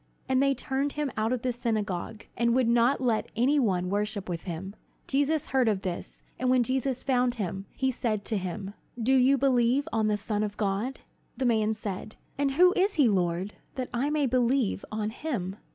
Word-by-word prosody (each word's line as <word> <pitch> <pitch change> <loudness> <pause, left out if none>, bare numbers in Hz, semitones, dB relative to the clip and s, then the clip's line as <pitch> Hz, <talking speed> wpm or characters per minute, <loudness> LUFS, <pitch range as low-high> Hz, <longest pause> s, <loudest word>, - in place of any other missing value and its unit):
And 260 0 +2
they 275 0 +3
turned 275 +2 -1
him 295 -2 -2
out 220 +2 0
of 255 -2 -1
the 255 - +1
synagogue, 215 -4 -3
and 235 0 +2
would 255 -2 +3
not 240 +4 +3
let 235 -4 +1
any 265 +6 +3
one 185 -8 +1
worship 205 -1 -2
with 170 -2 -4
him. 190 +3 -5 0.3
Jesus 285 +2 0
heard 260 -3 +2
of 200 -3 0
this; 180 -2 -5 0.2
and 255 - +1
when 255 -1 +4
Jesus 260 +1 -1
found 250 -2 +2
him, 195 -2 -4
he 265 -1 0
said 215 -4 -2
to 220 - -1
him: 190 +2 -5 0.3
"Do 240 +4 +2
you 265 +2 +5
believe 260 0 +2
on 220 -1 +2
the 210 -1 +1
Son 210 0 -2
of 205 -1 -3
God?" 210 +5 -1 0.4
The 260 - -1
man 220 -2 +2
said: 210 0 -5 0.2
"And 280 0 +1
who 360 +5 +6
is 390 +2 +2
he, 285 -5 +5
Lord, 185 -1 0 0.2
that 255 -2 -3
I 255 +4 0
may 300 -1 +1
believe 250 -3 +1
on 215 0 -2
him?" 220 - -4
235 Hz, 200 wpm, -28 LUFS, 210-265 Hz, 0.4 s, who